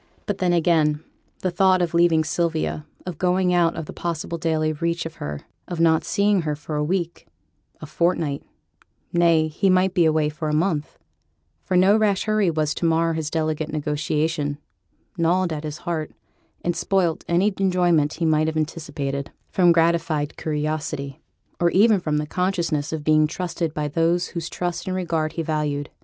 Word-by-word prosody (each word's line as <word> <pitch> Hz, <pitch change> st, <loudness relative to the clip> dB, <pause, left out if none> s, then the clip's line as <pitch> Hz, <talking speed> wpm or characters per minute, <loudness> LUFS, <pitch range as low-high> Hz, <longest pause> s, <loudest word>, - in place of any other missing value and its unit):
But 200 Hz, -1 st, -3 dB
then 180 Hz, -1 st, +2 dB
again, 160 Hz, -3 st, +2 dB, 0.4 s
the 185 Hz, -, 0 dB
thought 185 Hz, +1 st, +4 dB
of 175 Hz, -2 st, -1 dB
leaving 170 Hz, -2 st, +4 dB
Sylvia; 160 Hz, -1 st, -1 dB, 0.2 s
of 180 Hz, -4 st, -6 dB
going 180 Hz, 0 st, +2 dB
out 170 Hz, -1 st, +3 dB
of 165 Hz, -, -5 dB
possible 170 Hz, 0 st, -4 dB
daily 155 Hz, -1 st, 0 dB
reach 170 Hz, +2 st, -2 dB
of 165 Hz, -, -7 dB
her; 75 Hz, 0 st, -5 dB, 0.3 s
of 175 Hz, -2 st, -5 dB
not 160 Hz, -1 st, +4 dB
seeing 200 Hz, -1 st, +2 dB
her 150 Hz, -2 st, -2 dB
for 150 Hz, +1 st, -6 dB
a 150 Hz, -, 0 dB
week 170 Hz, +1 st, -2 dB, 0.5 s
a -, -, -6 dB
fortnight; 155 Hz, -2 st, 0 dB, 0.7 s
nay, 170 Hz, -2 st, +4 dB
he 180 Hz, +6 st, 0 dB
might 185 Hz, 0 st, +3 dB
be 175 Hz, -2 st, +3 dB
away 155 Hz, -1 st, +2 dB
for 155 Hz, +1 st, -4 dB
a 150 Hz, -, 0 dB
month, 160 Hz, -2 st, -1 dB, 0.7 s
for 185 Hz, -, 0 dB
no 190 Hz, +3 st, +5 dB
rash 210 Hz, -3 st, +2 dB
hurry 215 Hz, -3 st, +2 dB
was 155 Hz, -2 st, 0 dB
to -, -, -3 dB
mar 165 Hz, 0 st, +2 dB
his 160 Hz, -2 st, -3 dB
delicate 155 Hz, -1 st, -2 dB
negotiation, 150 Hz, 0 st, -1 dB, 0.6 s
gnawed 170 Hz, +1 st, +2 dB
at 150 Hz, 0 st, -5 dB
his 150 Hz, -1 st, -5 dB
heart, 165 Hz, -3 st, -3 dB, 0.6 s
and 175 Hz, -1 st, +1 dB
spoilt 175 Hz, -1 st, 0 dB
any 185 Hz, +4 st, +2 dB
enjoyment 175 Hz, -6 st, +2 dB
he 170 Hz, -, -2 dB
might 155 Hz, -1 st, +3 dB
have 160 Hz, 0 st, -2 dB
anticipated 145 Hz, -3 st, -3 dB, 0.2 s
from 175 Hz, -2 st, +4 dB
gratified 165 Hz, -3 st, +1 dB
curiosity, 150 Hz, -2 st, -3 dB, 0.4 s
or 175 Hz, -, +3 dB
even 205 Hz, +3 st, +4 dB
from 155 Hz, -3 st, -1 dB
the 150 Hz, -, -1 dB
consciousness 170 Hz, -3 st, -1 dB
of 160 Hz, -2 st, -4 dB
being 155 Hz, 0 st, +4 dB
trusted 170 Hz, -1 st, -3 dB
by 150 Hz, -1 st, -2 dB
those 165 Hz, +3 st, +1 dB
whose 170 Hz, -2 st, -5 dB
trust 175 Hz, +2 st, -3 dB
and 185 Hz, -, -1 dB
regard 165 Hz, -4 st, -1 dB
he 165 Hz, -, -2 dB
valued. 150 Hz, -2 st, -2 dB
165 Hz, 175 wpm, -23 LUFS, 155-175 Hz, 0.7 s, no